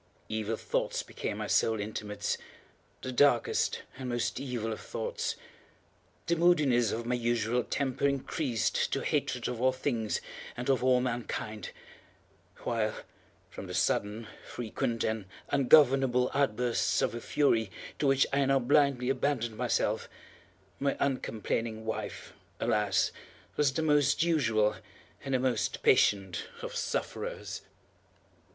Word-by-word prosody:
Evil 110 0 -2
thoughts - - -1
became - - -4
my - - -3
sole 110 -1 +2
intimates—the 105 +4 -6
darkest 125 -2 +3 0.2
and 130 -1 -4
most 120 -1 -1
evil 120 -5 -3
of - - -7
thoughts. - - -3 0.9
The 170 - +2
moodiness 150 - +4
of 115 +1 -3
my 125 - 0
usual 120 0 +1
temper 135 +1 0
increased 135 - 0
to - - 0
hatred - - -1
of 125 -2 -4
all 130 0 +4
things 125 -4 -1 0.4
and 125 +3 0
of 130 - +1
all 130 -1 +4
mankind; 115 -4 -3 0.9
while, 110 -2 0 0.6
from 95 - -8
the 90 - -5
sudden, 105 +5 0 0.2
frequent, 115 0 -3
and 110 -2 -1 0.2
ungovernable 135 -2 +5
outbursts 125 -3 +1
of - - 0
a 120 - -5
fury 115 -8 +2 0.3
to 145 - +2
which 135 0 +4
I 140 0 +3
now 135 0 +4
blindly 135 -1 +3
abandoned 125 -4 -1
myself, - - 0 0.7
my 140 0 0
uncomplaining 115 -4 -1
wife, 110 - -5 0.3
alas, 105 -3 +2 0.4
was 145 -3 +3
the 160 - -1
most 150 0 +3
usual 115 -11 +2 0.5
and 135 -1 -1
the - - +2
most 125 -4 0
patient 95 -3 +3 0.2
of - - -5
sufferers. - - -3
120 Hz, 125 wpm, -30 LUFS, 110-135 Hz, 0.9 s, ungovernable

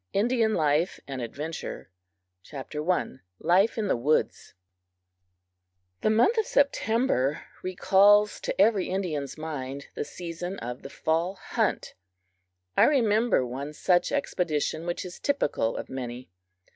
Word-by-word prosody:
INDIAN 225 +1 +2
LIFE 155 +2 +1
AND 135 -2 -5
ADVENTURE 145 - -6 0.6
I: 150 +2 -2 0.2
Life 195 - +3
in 215 -2 0
the - - +2
Woods 135 - 0 1.5
THE - - +2
month 240 - +4
of 435 - 0
September 225 - +1 0.2
recalls 200 +3 +4
to - - -4
every 205 -1 +4
Indian's 160 -8 -3
mind 140 -3 -6
the - - -3
season 175 +4 -6
of 120 +1 -6
the 135 - -9
fall 165 +6 -1
hunt. - - -2 0.8
I - - +6
remember 230 - +3
one 135 +4 -5
such 175 +3 +2
expedition 170 - -1
which 175 - -3
is 180 - -9
typical 150 - 0
of - - -5
many. 125 -4 -6
175 Hz, 120 wpm, -27 LUFS, 140-210 Hz, 1.5 s, I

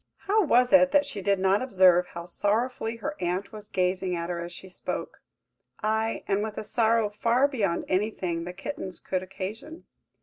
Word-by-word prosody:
How 425 +2 +3
was 250 -5 +3
it 275 -1 +7
that 290 0 +5
she 205 - -6
did 200 +1 +2
not 190 +2 +2
observe 185 -7 +4
how 170 0 -8
sorrowfully 225 +5 -1
her 290 +6 -4
aunt 180 +2 -2
was 210 -1 -10
gazing 185 -1 0
at 170 +1 -3
her 170 -1 -3
as 170 - -7
she 190 - -10
spoke; 185 - -6 0.6
aye, 220 +1 0
and 200 0 +1
with 215 0 -4
a - - -3
sorrow 225 0 +2
far 230 +6 +2
beyond 205 - -1
anything 185 -4 -1
the 180 - -5
kittens 195 -2 -6
could 185 -1 -2
occasion? 200 - -7
205 Hz, 180 wpm, -27 LUFS, 185-230 Hz, 0.6 s, it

